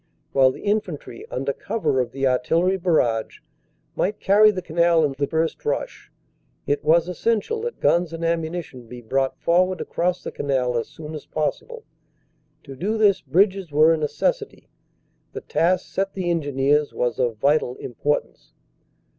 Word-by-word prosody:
While 135 -1 +5
the 130 - -8
infantry, 200 - -3
under 135 +2 -2
cover 165 -9 -1
of 120 -1 -4
the 135 +1 -2
artillery 165 +9 +2
barrage, 155 -12 0 0.6
might 205 +3 -1
carry 210 +2 +5
the 185 -4 -3
canal 170 -1 +3
in 140 - -2
the 140 +1 -1
first 160 0 -1
rush, 145 - -4 0.5
it 145 +1 -1
was 165 +3 +3
essential 230 - -1
that 475 +1 -5
guns 175 -1 +2
and 165 0 -4
ammunition 165 -6 -3
be 125 +1 -9
brought 135 +3 -1
forward 185 +2 +2
across 180 +1 -2
the - - -5
canal 130 -3 -1
as 115 - -1
soon 155 0 -10
as 155 - -8
possible. 465 - -3 0.8
To 135 -2 -10
do 205 +11 -2
this 200 -3 +3
bridges 185 +4 +1
were 155 +3 +5
a - - 0
necessity. 320 - -2 0.6
The - - -6
task 175 +4 +1
set 195 0 -2
the 180 -3 -1
Engineers 145 -2 +1
was 120 0 -1
of 120 -3 0
vital 140 +1 +1
importance." 140 +5 -3
160 Hz, 155 wpm, -23 LUFS, 135-185 Hz, 0.8 s, While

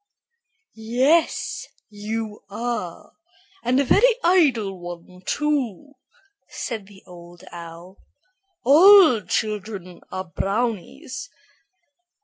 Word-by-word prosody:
"Yes, 255 +9 0 0.2
you 210 +1 -5
are, 210 -5 -5 0.5
and 250 +2 +1
a - - +3
very 465 - +4
idle 255 - +2
one, 175 +1 -10
too," 285 -4 -1 0.6
said 220 -5 -5
the 195 -2 -17
Old 175 -1 -14
Owl. 170 +2 -11 0.7
"All 320 - +7
children 205 -4 -4
are 185 - -4
brownies." 230 - -3
220 Hz, 85 wpm, -23 LUFS, 185-270 Hz, 0.7 s, All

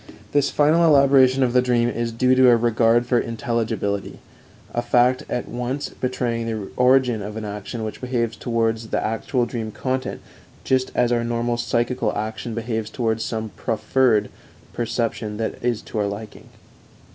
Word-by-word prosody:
This 145 -1 +2
final 155 +3 +3
elaboration 135 -4 +5
of 120 -1 +1
the 125 - +5
dream 120 -1 +2
is 120 -1 -2
due 125 +3 +2
to 130 -1 +6
a 120 - +6
regard 115 +1 +3
for 120 0 +2
intelligibility 115 -4 -2 0.6
a 120 - 0
fact 125 +1 +3
at 120 - -2
once 125 +4 -3
betraying 120 -2 -2
the 110 -3 -4
origin 125 -3 +3
of 105 +2 -6
an 110 - -5
action 105 +3 -5
which 110 - -6
behaves 120 -3 -1
towards 115 -1 -1
the - - -1
actual 120 +3 -1
dream 115 -2 -4
content 130 +3 -3 0.4
just 130 -1 +1
as 120 -1 +2
our 120 -1 +1
normal 120 0 -1
psychical 120 -1 0
action 110 +1 -4
behaves 115 -2 -3
towards 110 -2 -1
some 110 -1 -3
proffered 115 +1 +1 0.4
perception 115 -2 -2
that 115 +1 -4
is 120 -3 0
to 110 - -5
our 105 - +1
liking. 100 +2 -8
120 Hz, 160 wpm, -22 LUFS, 110-125 Hz, 0.6 s, to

